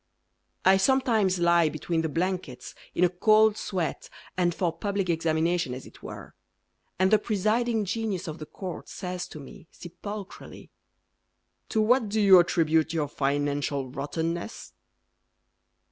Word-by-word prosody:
I 190 0 +6
sometimes 220 -5 +2
lie 170 -2 +4
Between 160 +2 -2
the 160 - -2
blankets 170 -6 -3 0.2
In 180 - +2
a 180 - +5
cold 215 +4 +4
sweat 180 -6 -3 0.3
And 175 -1 +2
for 175 -3 0
public 195 0 -1
examination 165 -3 0
as 130 - -9
it - - -16
were, - - -9 0.6
And 190 +2 +2
the 215 - +6
presiding 220 +2 0
genius 200 -2 -3
of 155 0 -6
the 155 - -8
court 185 -4 -7
Says 180 -1 -5
to 155 - -10
me, 140 +3 -12
sepulchrally, 200 +3 -9 1.0
"To 220 - +1
what 235 0 +3
do 215 +2 0
you 195 -3 +8
attribute 160 -2 +2
your 155 -3 0
financial 140 -1 -1
rottenness?" 165 - -4
180 Hz, 135 wpm, -27 LUFS, 160-205 Hz, 1.0 s, you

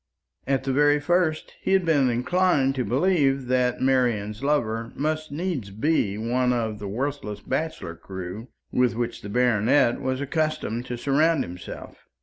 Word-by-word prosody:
At 135 -1 +1
the 135 0 -1
very 145 +1 +4
first 160 0 0
he - - 0
had 190 -2 +3
been 145 -6 +3
inclined 135 +2 +2
to 130 -2 -1
believe 135 -1 +2
that 125 -1 +1
Marian's 120 -5 +1
lover 115 -6 0
must 155 +1 -2
needs 150 - -3
be 105 -1 0
one 125 +3 +1
of 110 -3 -1
the 100 - -5
worthless 115 -2 -3
bachelor 135 - -3
crew 95 +5 -7 0.2
with 125 -2 +2
which 120 0 -3
the 100 - -7
baronet 120 +2 +3
was 130 0 -1
accustomed 140 -5 -2
to 120 - -4
surround 145 +4 +2
himself. 90 0 -10
130 Hz, 150 wpm, -25 LUFS, 115-150 Hz, 0.2 s, very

